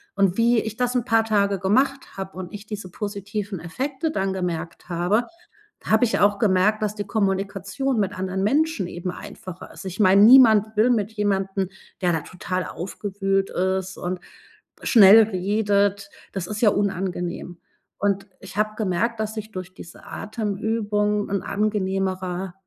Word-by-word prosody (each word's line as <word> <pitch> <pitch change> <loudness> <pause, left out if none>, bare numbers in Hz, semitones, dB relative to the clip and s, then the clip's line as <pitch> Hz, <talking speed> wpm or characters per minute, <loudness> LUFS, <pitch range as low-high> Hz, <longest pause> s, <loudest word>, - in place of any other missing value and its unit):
Und 195 -2 +2
wie 235 0 +4
ich 220 0 -5
das 250 0 0
'n 245 -2 +1
paar 225 -3 +3
Tage 200 -2 +2
gemacht 260 +9 0
habe 190 -1 -6
und 185 0 -7
ich 205 +1 -9
diese 210 -3 -6
positiven 205 0 -4
Effekte 265 - -3
dann 195 -7 -1
gemerkt 175 -2 -4
habe, 180 +7 +1 0.6
habe 220 +2 +3
ich 235 - +1
auch 205 0 +3
gemerkt, 210 +1 +3
dass 210 0 -1
die 205 - -3
Kommunikation 195 +4 -1
mit 200 -1 -2
anderen 190 0 -2
Menschen 280 - +1
eben 175 +1 -5
einfacher 185 0 -10
ist. - - -11
Ich 190 +1 -6
meine, 195 0 +6
niemand 220 -3 +7
will 220 +4 +4
mit 220 -3 +1
jemandem, 195 -2 -1 0.3
der 180 - +3
da 160 -2 -1
total 185 +2 -4
aufgewühlt 195 +1 -2
ist 190 +1 -1
und 180 +1 -3 0.6
schnell 220 -1 +8
redet. 200 0 0 0.2
Das 190 -3 -4
ist 210 0 -4
ja 215 - +5
unangenehm. 180 -3 -2 0.4
Und 200 0 0
ich 190 0 -11
habe 215 0 0
gemerkt, 215 +3 -1
dass 220 0 -3
ich 215 0 -6
durch 185 -1 -7
diese 170 - -12
Atemübung 210 -1 -1
'n 200 -2 -1
angenehmeres 190 -3 -2
200 Hz, 155 wpm, -23 LUFS, 190-215 Hz, 0.6 s, schnell